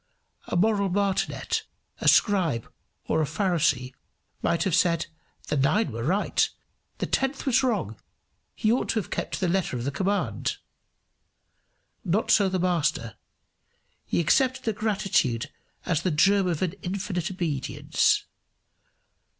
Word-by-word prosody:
A -, -, -3 dB
moral 200 Hz, 0 st, +2 dB
martinet, 195 Hz, +1 st, 0 dB, 0.4 s
a -, -, -2 dB
scribe, 175 Hz, -, +3 dB, 0.4 s
or 160 Hz, -, +1 dB
a -, -, +2 dB
Pharisee, 155 Hz, -6 st, 0 dB, 0.5 s
might 170 Hz, 0 st, +1 dB
have 190 Hz, -4 st, -1 dB
said 170 Hz, -1 st, +2 dB, 0.4 s
"The -, -, +1 dB
nine 140 Hz, -, +2 dB
were 115 Hz, +1 st, -5 dB
right, 190 Hz, -, +1 dB, 0.5 s
the -, -, -2 dB
tenth 270 Hz, +1 st, -1 dB
was 265 Hz, -1 st, +3 dB
wrong: 210 Hz, -, -1 dB, 0.6 s
he 215 Hz, -, +1 dB
ought 245 Hz, -, 0 dB
to 225 Hz, -, +1 dB
have 205 Hz, -, -7 dB
kept -, -, -2 dB
to -, -, -6 dB
the 185 Hz, -, +2 dB
letter 175 Hz, -7 st, 0 dB
of 120 Hz, -, -4 dB
the 140 Hz, -, -1 dB
command." 195 Hz, +6 st, -1 dB, 1.5 s
Not 200 Hz, +4 st, +1 dB
so 200 Hz, -2 st, +5 dB
the 185 Hz, -, -1 dB
Master: 170 Hz, -, 0 dB, 0.9 s
he -, -, -1 dB
accepted 260 Hz, -, +2 dB
the 225 Hz, -, 0 dB
gratitude 195 Hz, -, 0 dB, 0.3 s
as 165 Hz, -3 st, +1 dB
the 185 Hz, -, 0 dB
germ 190 Hz, +5 st, +3 dB
of 170 Hz, -1 st, -1 dB
an 180 Hz, -2 st, -1 dB
infinite 185 Hz, -1 st, -3 dB
obedience. 165 Hz, -8 st, 0 dB
185 Hz, 140 wpm, -26 LUFS, 155-205 Hz, 1.5 s, so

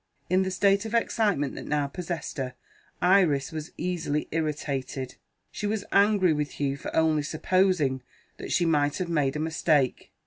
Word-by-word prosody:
In 185 Hz, +1 st, +4 dB
the 190 Hz, -, 0 dB
state 195 Hz, +1 st, +2 dB
of 225 Hz, +1 st, -3 dB
excitement 205 Hz, -, +1 dB
that -, -, -8 dB
now 150 Hz, -1 st, +1 dB
possessed 170 Hz, +1 st, -5 dB
her, 130 Hz, -1 st, -3 dB, 0.5 s
Iris 180 Hz, -7 st, +3 dB
was 155 Hz, -1 st, -6 dB
easily 165 Hz, -4 st, -2 dB
irritated; 145 Hz, -4 st, -3 dB, 0.4 s
she 205 Hz, -, -3 dB
was 210 Hz, -1 st, -2 dB
angry 200 Hz, -4 st, +4 dB
with 150 Hz, -1 st, -2 dB
Hugh 140 Hz, -1 st, -1 dB
for 140 Hz, -, -7 dB
only 160 Hz, -1 st, +3 dB
supposing 155 Hz, -3 st, +1 dB, 0.4 s
that -, -, -7 dB
she 175 Hz, -, +2 dB
might 145 Hz, -3 st, +2 dB
have 180 Hz, -2 st, -3 dB
made 150 Hz, -5 st, +1 dB
a -, -, -2 dB
mistake. 155 Hz, -4 st, +1 dB
160 Hz, 165 wpm, -27 LUFS, 145-185 Hz, 0.5 s, In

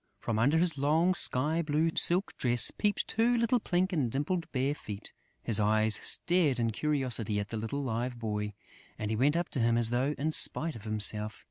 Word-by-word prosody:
From 110 Hz, -2 st, -3 dB
under 140 Hz, +8 st, +2 dB
his 165 Hz, -4 st, +2 dB
long 160 Hz, +6 st, +2 dB
sky 155 Hz, 0 st, +2 dB
blue 155 Hz, +1 st, 0 dB
silk 180 Hz, +4 st, +2 dB
dress 120 Hz, -2 st, +1 dB
peeped 205 Hz, -1 st, -1 dB
two 235 Hz, +2 st, +1 dB
little 235 Hz, +1 st, +1 dB
pink 185 Hz, -1 st, -1 dB
and 135 Hz, -9 st, -1 dB
dimpled 155 Hz, +5 st, -3 dB
bare 135 Hz, +2 st, -1 dB
feet. 105 Hz, -8 st, -7 dB, 0.3 s
His 110 Hz, -2 st, 0 dB
eyes 110 Hz, +1 st, +3 dB
stared 170 Hz, -7 st, +2 dB
in 115 Hz, -1 st, -1 dB
curiosity 120 Hz, -6 st, -2 dB
at 105 Hz, -, -5 dB
the 115 Hz, -, -5 dB
little 115 Hz, +6 st, -4 dB
Live 120 Hz, 0 st, -3 dB
Boy; 105 Hz, -2 st, -4 dB, 0.4 s
and 105 Hz, 0 st, -4 dB
he -, -, -1 dB
went 140 Hz, +8 st, +1 dB
up 175 Hz, -, -2 dB
to 135 Hz, -, -4 dB
him 115 Hz, 0 st, +2 dB
as 115 Hz, -1 st, +1 dB
though 130 Hz, +5 st, -1 dB
in 155 Hz, +3 st, -2 dB
spite 160 Hz, 0 st, +3 dB
of 115 Hz, -1 st, -11 dB
himself. 110 Hz, 0 st, 0 dB
135 Hz, 200 wpm, -29 LUFS, 110-165 Hz, 0.4 s, eyes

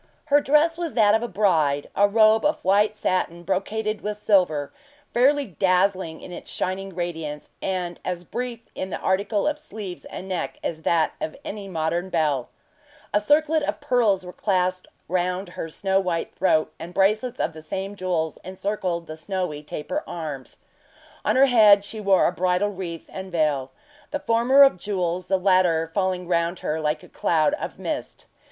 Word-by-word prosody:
Her 290 Hz, -, +7 dB
dress 305 Hz, +4 st, +3 dB
was 335 Hz, -4 st, -3 dB
that 210 Hz, -3 st, +5 dB
of 220 Hz, -, +3 dB
a 240 Hz, -, -2 dB
bride; 160 Hz, -9 st, +1 dB
a 205 Hz, -, +5 dB
robe 215 Hz, +1 st, +5 dB
of 300 Hz, -, 0 dB
white 205 Hz, +2 st, +3 dB
satin 175 Hz, -4 st, -1 dB
brocaded 210 Hz, +4 st, -2 dB
with 210 Hz, 0 st, -3 dB
silver, 180 Hz, -9 st, +2 dB, 0.4 s
fairly 280 Hz, +4 st, +4 dB
dazzling 185 Hz, -, +1 dB
in -, -, -10 dB
its -, -, -8 dB
shining 190 Hz, 0 st, -3 dB
radiance, 160 Hz, -4 st, -4 dB
and 180 Hz, -2 st, -3 dB
as 180 Hz, -1 st, -3 dB
brief 240 Hz, +4 st, -5 dB
in 190 Hz, -, -4 dB
the -, -, -3 dB
article 200 Hz, +5 st, 0 dB
of 300 Hz, 0 st, -1 dB
sleeves 200 Hz, -7 st, -8 dB
and 190 Hz, -, -8 dB
neck 185 Hz, -2 st, -3 dB
as 160 Hz, -1 st, -3 dB
that 165 Hz, -1 st, +2 dB
of 155 Hz, -, -3 dB
any 200 Hz, -1 st, -6 dB
modern 170 Hz, +1 st, -2 dB
belle. 150 Hz, -7 st, 0 dB, 0.6 s
A 205 Hz, -, +4 dB
circlet 305 Hz, +7 st, +3 dB
of -, -, -2 dB
pearls 215 Hz, -7 st, +2 dB
were 180 Hz, -, -8 dB
clasped 185 Hz, -2 st, 0 dB, 0.2 s
round 180 Hz, +2 st, -1 dB
her 165 Hz, -2 st, -6 dB
snow 190 Hz, +4 st, 0 dB
white 175 Hz, -3 st, -2 dB
throat, 160 Hz, -4 st, +2 dB
and 175 Hz, +2 st, -8 dB
bracelets 215 Hz, +5 st, +2 dB
of 160 Hz, -, -1 dB
the 155 Hz, -, -10 dB
same 190 Hz, +6 st, -5 dB
jewels 175 Hz, -4 st, -1 dB
encircled 185 Hz, -2 st, -3 dB
the 155 Hz, -, -7 dB
snowy 180 Hz, -2 st, -3 dB
taper 150 Hz, -, -4 dB
arms. 150 Hz, -6 st, -6 dB, 0.7 s
On -, -, +1 dB
her 265 Hz, +1 st, +7 dB
head 210 Hz, -6 st, +6 dB
she 220 Hz, +1 st, -6 dB
wore 195 Hz, -2 st, +4 dB
a -, -, +3 dB
bridal 180 Hz, +3 st, +1 dB
wreath 180 Hz, -4 st, -6 dB
and 190 Hz, 0 st, -7 dB
veil 150 Hz, -5 st, 0 dB, 0.4 s
the 290 Hz, -, -3 dB
former 260 Hz, +1 st, +5 dB
of 270 Hz, -10 st, +4 dB
jewels, 180 Hz, -3 st, -2 dB
the 190 Hz, -, +2 dB
latter 180 Hz, -4 st, +2 dB
falling 185 Hz, -2 st, -1 dB
round 170 Hz, 0 st, 0 dB
her 155 Hz, +1 st, -2 dB
like 150 Hz, 0 st, -1 dB
a -, -, -13 dB
cloud 160 Hz, -, +1 dB
of 300 Hz, -, -4 dB
mist. -, -, -5 dB
185 Hz, 175 wpm, -24 LUFS, 170-210 Hz, 0.7 s, Her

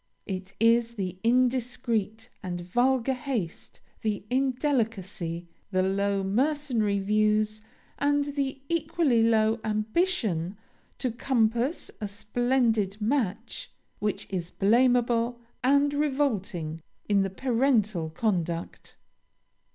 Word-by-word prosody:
It 190 Hz, 0 st, -6 dB
is 230 Hz, +1 st, +3 dB
the 185 Hz, -3 st, -4 dB
indiscreet 240 Hz, -2 st, 0 dB
and 175 Hz, -2 st, -4 dB
vulgar 245 Hz, +7 st, +2 dB
haste, 245 Hz, -, -4 dB, 0.2 s
the 210 Hz, -2 st, -2 dB
indelicacy, 225 Hz, -, -1 dB, 0.2 s
the 185 Hz, -2 st, +1 dB
low 200 Hz, +1 st, +1 dB
mercenary 240 Hz, -1 st, +1 dB
views, 215 Hz, +1 st, +1 dB, 0.4 s
and 290 Hz, 0 st, +2 dB
the 270 Hz, -1 st, -2 dB
equally 320 Hz, -6 st, +2 dB
low 225 Hz, 0 st, +3 dB
ambition 215 Hz, -, 0 dB, 0.4 s
to 255 Hz, -, -1 dB
compass 240 Hz, +4 st, 0 dB
a 210 Hz, -, -1 dB
splendid 220 Hz, -1 st, 0 dB
match, 225 Hz, -2 st, -2 dB, 0.3 s
which 210 Hz, -1 st, -2 dB
is 180 Hz, -3 st, -3 dB
blameable 240 Hz, +2 st, +2 dB, 0.2 s
and 280 Hz, +2 st, +4 dB
revolting 215 Hz, -, -1 dB, 0.3 s
in 200 Hz, -1 st, +3 dB
the 195 Hz, -, 0 dB
parental 220 Hz, -, +1 dB
conduct. 170 Hz, -2 st, -2 dB
225 Hz, 95 wpm, -27 LUFS, 200-255 Hz, 0.4 s, and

